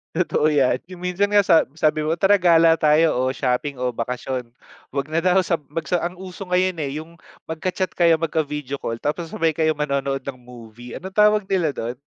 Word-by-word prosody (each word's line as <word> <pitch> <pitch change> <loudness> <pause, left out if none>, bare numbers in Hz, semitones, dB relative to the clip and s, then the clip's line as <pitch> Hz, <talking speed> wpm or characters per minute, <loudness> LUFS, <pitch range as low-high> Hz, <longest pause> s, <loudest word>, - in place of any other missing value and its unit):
Totoo 165 -3 +1
‘yan. 135 -4 +2
Yung 180 -1 -11
minsan 180 +3 0
nga 205 0 +4
sa 165 -3 +4
sabi 155 -1 +1
mo, 155 +2 0
tara 195 +3 +3
gala 165 -2 +5
tayo 155 +1 +4
o 130 +1 0
shopping 135 +2 -1
o 125 0 -2
bakasyon. 125 +1 -4 0.4
Huwag 140 +2 -4
na 160 - +1
daw, 185 +2 +3
sa 170 -2 -1
mag 165 +2 -4
sa 170 +4 0
ang 175 +1 -4
uso 185 +1 -9
ngayon, 180 -1 +1
eh, 140 -3 -2
yung 170 +1 -20 0.2
magka-chat 185 +3 -3
kayo, 170 -2 +4
magka-video 150 -4 -3
call, 115 0 -5
tapos 165 +3 -2
sabay 165 0 0
kayo 155 0 0
manonood 140 -2 -2
ng 130 -1 -7
movie. 120 -1 -12
Anong 190 +1 -8
tawag 210 0 +4
nila 175 -7 0
do’n? 120 +2 -4
160 Hz, 200 wpm, -22 LUFS, 140-180 Hz, 0.4 s, gala